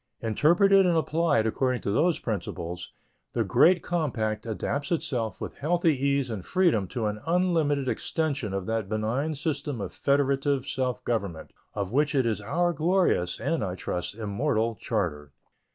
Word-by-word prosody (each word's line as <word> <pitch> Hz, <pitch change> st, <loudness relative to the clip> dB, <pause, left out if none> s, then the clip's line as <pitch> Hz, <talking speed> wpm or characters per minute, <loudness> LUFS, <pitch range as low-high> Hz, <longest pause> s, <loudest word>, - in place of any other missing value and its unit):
Interpreted 175 Hz, -, +4 dB
and 175 Hz, -2 st, +3 dB
applied 160 Hz, -7 st, +2 dB
according 125 Hz, +2 st, 0 dB
to 100 Hz, -, -1 dB
those 165 Hz, -, +2 dB
principles, 90 Hz, -4 st, -5 dB, 0.4 s
the -, -, +1 dB
great 175 Hz, 0 st, +4 dB
compact 120 Hz, -11 st, -1 dB
adapts 140 Hz, +6 st, -3 dB
itself 135 Hz, -10 st, -1 dB
with -, -, -6 dB
healthy 165 Hz, +1 st, +2 dB
ease 140 Hz, -1 st, 0 dB
and 100 Hz, -5 st, -4 dB
freedom 165 Hz, -, +2 dB
to 115 Hz, +3 st, -3 dB
an 105 Hz, 0 st, -2 dB
unlimited 165 Hz, -6 st, +1 dB
extension 140 Hz, -, -1 dB
of 95 Hz, -1 st, -3 dB
that 110 Hz, -2 st, -2 dB
benign 115 Hz, +9 st, -1 dB
system 145 Hz, -4 st, -3 dB
of 100 Hz, -3 st, -5 dB
federative 140 Hz, -1 st, +1 dB
self 130 Hz, -2 st, -2 dB
government 100 Hz, -9 st, -3 dB, 0.2 s
of 100 Hz, -2 st, -2 dB
which 145 Hz, +3 st, +1 dB
it 130 Hz, -3 st, +3 dB
is 110 Hz, -2 st, 0 dB
our 175 Hz, +11 st, 0 dB
glorious 160 Hz, -, +1 dB
and, 165 Hz, -6 st, -1 dB
I 90 Hz, -2 st, -3 dB
trust, 90 Hz, +1 st, -3 dB
immortal 115 Hz, +2 st, 0 dB
charter. 85 Hz, -11 st, -3 dB
130 Hz, 150 wpm, -27 LUFS, 105-160 Hz, 0.4 s, Interpreted